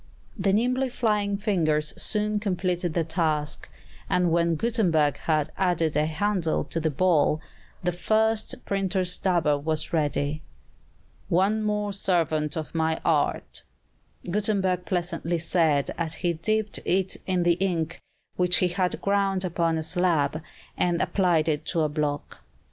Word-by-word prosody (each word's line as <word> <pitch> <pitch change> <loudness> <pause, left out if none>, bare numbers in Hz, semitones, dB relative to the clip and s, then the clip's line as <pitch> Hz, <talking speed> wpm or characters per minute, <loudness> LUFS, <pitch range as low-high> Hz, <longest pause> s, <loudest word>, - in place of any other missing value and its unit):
The 195 -2 +1
nimbly 250 +5 +1
flying 210 -4 0
fingers 160 -8 0
soon 210 0 0
completed 180 -4 -1
the 170 - +2
task; 155 -2 -1 0.4
and 180 -2 +2
when 170 0 +2
Gutenberg 170 - +1
had 155 -1 0
added 175 -4 +1
a 150 +1 +2
handle 175 0 0
to 165 - -4
the 160 0 0
ball, 155 0 +2 0.4
the 180 - +1
first 220 +4 0
printer's 190 -2 0
dabber 170 -6 +2
was 155 +2 -2
ready. 150 -1 0 0.9
"One 195 +5 +2
more 210 -1 -1
servant 160 -6 0
of 155 - -5
my 160 -1 0
art," 155 -3 0 0.7
Gutenberg 190 -2 0
pleasantly 175 0 -1
said 160 -4 +1
as 165 -1 -2
he 175 -1 0
dipped 215 +6 -1
it 190 0 0
in 185 -2 +1
the 175 0 +2
ink 175 -3 -1 0.4
which 180 -1 +3
he 180 - +2
had 180 0 -1
ground 195 -1 +1
upon 170 -2 0
a 160 - -2
slab, 165 -4 +1 0.3
and 175 -1 +1
applied 175 -6 +2
it 150 -1 0
to 165 -1 +1
a 155 - +1
block. 145 -1 -3
175 Hz, 140 wpm, -26 LUFS, 160-195 Hz, 0.9 s, which